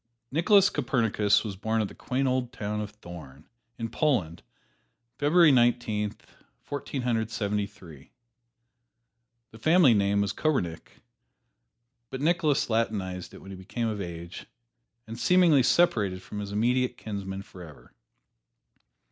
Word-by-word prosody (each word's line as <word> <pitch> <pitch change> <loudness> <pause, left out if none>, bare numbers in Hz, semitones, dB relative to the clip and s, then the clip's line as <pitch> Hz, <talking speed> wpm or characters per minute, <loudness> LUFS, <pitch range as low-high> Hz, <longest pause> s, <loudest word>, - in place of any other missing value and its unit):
Nicholas 190 +6 +4
Copernicus 115 -7 +1
was 105 -3 -5
born 110 +3 -1
at 110 - 0
the - - -12
quaint 130 +2 -2
old 125 -1 -1
town 105 -1 -4
of 105 - -5
Thorn, 85 -8 -12 0.3
in 115 - -3
Poland, 105 - 0 0.8
February 155 +2 +5
Nineteen, 120 -4 +1 0.4
Fourteen 140 -2 -5
Hundred 115 -3 0
Seventy 105 -2 -2
three. 85 -9 -15 1.4
The 110 - -14
family 160 -2 +5
name 100 -1 +2
was 100 0 -1
Koppernigk, 110 - -2 1.1
but 130 - -6
Nicholas 155 -1 +1
latinized 100 -6 -2
it - - -13
when 95 - -10
he - - -7
became 110 +5 -3
of 105 -2 -4
age, 85 -1 -8 0.6
and 115 0 -8
seemingly 175 -6 +5
separated 105 - +2
from 105 - -7
his 100 -1 -5
immediate 125 +4 +1
kinsmen 100 -2 -6
forever. 85 -7 -14
110 Hz, 130 wpm, -27 LUFS, 100-130 Hz, 1.4 s, February